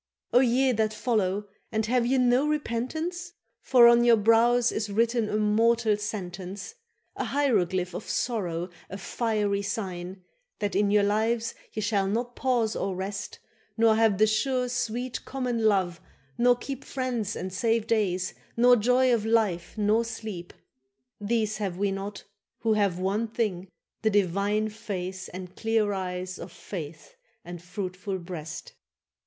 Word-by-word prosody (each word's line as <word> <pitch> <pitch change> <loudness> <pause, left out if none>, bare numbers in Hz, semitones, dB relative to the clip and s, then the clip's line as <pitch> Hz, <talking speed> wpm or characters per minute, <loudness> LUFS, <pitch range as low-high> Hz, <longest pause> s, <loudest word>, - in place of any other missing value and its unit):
—O 245 - +7
ye 260 +1 +3
that 215 -2 0
follow, 205 -4 0 0.2
and 220 -1 0
have 240 +1 +1
ye 265 +2 +2
no 250 +3 +3
repentance? 315 +6 -2 0.3
For 245 -3 +7
on 235 0 +6
your 235 -1 +6
brows 230 +3 +4
is 215 -1 -2
written 230 +1 +1
a 210 - 0
mortal 220 +1 +3
sentence, 195 - -6 0.4
An - - -3
hieroglyph 190 -10 +1
of - - -6
sorrow, 180 -7 -2 0.2
a 195 - -6
fiery 205 0 -1
sign, 185 -2 -5 0.3
That 205 -2 -2
in 200 +1 +3
your 205 0 +4
lives 225 +3 +1 0.2
ye 215 - -3
shall 200 -2 +1
not 240 +4 -2
pause 240 -4 +1
or 195 -1 -2
rest, 195 +2 -5 0.4
Nor 225 -1 +5
have 220 -3 +3
the 215 - +5
sure 250 +4 +1
sweet 245 0 -3
common 245 -4 -2
love, 185 -4 +2 0.3
nor 245 +1 +4
keep 270 +2 -6
Friends 245 -6 -2
and 185 0 -5
safe 225 +2 +1
days, 190 -5 0 0.2
nor 245 +1 +7
joy 250 +3 +3
of 225 -3 +1
life 215 -6 0
nor 215 +2 +3
sleep. 215 -6 -6 0.7
—These 215 0 0
have 195 -4 -3
we 200 0 +1
not, 195 +1 -5 0.4
who 225 -1 +2
have 200 -4 +1
one 200 +5 0
thing, 205 -5 -2 0.3
the 220 - +3
divine 205 +2 +1
Face 185 -3 -5
and 185 0 -9
clear 220 -2 +1
eyes 185 -1 -4
of 170 - -8
faith 160 -6 -8 0.3
and 175 -1 -8
fruitful 185 +1 -4
breast. 170 -4 -7
215 Hz, 150 wpm, -27 LUFS, 190-235 Hz, 0.7 s, O